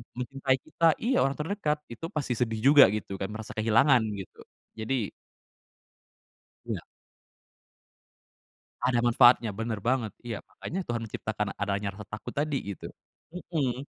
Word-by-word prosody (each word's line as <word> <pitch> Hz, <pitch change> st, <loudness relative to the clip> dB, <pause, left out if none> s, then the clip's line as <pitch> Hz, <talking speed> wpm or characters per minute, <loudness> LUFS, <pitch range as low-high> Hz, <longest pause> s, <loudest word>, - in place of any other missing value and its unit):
mencintai 130 Hz, +2 st, 0 dB
kita 165 Hz, -, -1 dB, 0.2 s
iya 255 Hz, +3 st, +2 dB
orang 135 Hz, +1 st, +1 dB
terdekat 155 Hz, -2 st, -1 dB
itu 120 Hz, +7 st, -7 dB
pasti 145 Hz, -5 st, -1 dB
sedih 110 Hz, -2 st, -1 dB
juga 145 Hz, -2 st, +10 dB
gitu 100 Hz, -2 st, -4 dB
kan 95 Hz, -, -2 dB
merasa 110 Hz, 0 st, -7 dB
kehilangan 115 Hz, +4 st, +5 dB, 0.2 s
gitu, 95 Hz, -, -14 dB, 0.4 s
jadi 110 Hz, 0 st, -1 dB, 1.6 s
Iya. -, -, -4 dB, 2.0 s
Ada 125 Hz, -1 st, +3 dB
manfaatnya 120 Hz, -1 st, +5 dB
bener 115 Hz, 0 st, -3 dB
banget 120 Hz, 0 st, 0 dB
iya 115 Hz, -3 st, -3 dB
makanya 185 Hz, -, -5 dB
Tuhan 120 Hz, -1 st, -2 dB
menciptakan 105 Hz, 0 st, -3 dB
adanya 100 Hz, 0 st, -1 dB
rasa 105 Hz, -, -9 dB
takut 105 Hz, -1 st, -6 dB
tadi 145 Hz, -1 st, 0 dB, 0.2 s
gitu, -, -, -9 dB, 0.4 s
mhm. 140 Hz, -7 st, -2 dB
120 Hz, 130 wpm, -28 LUFS, 110-140 Hz, 2.0 s, juga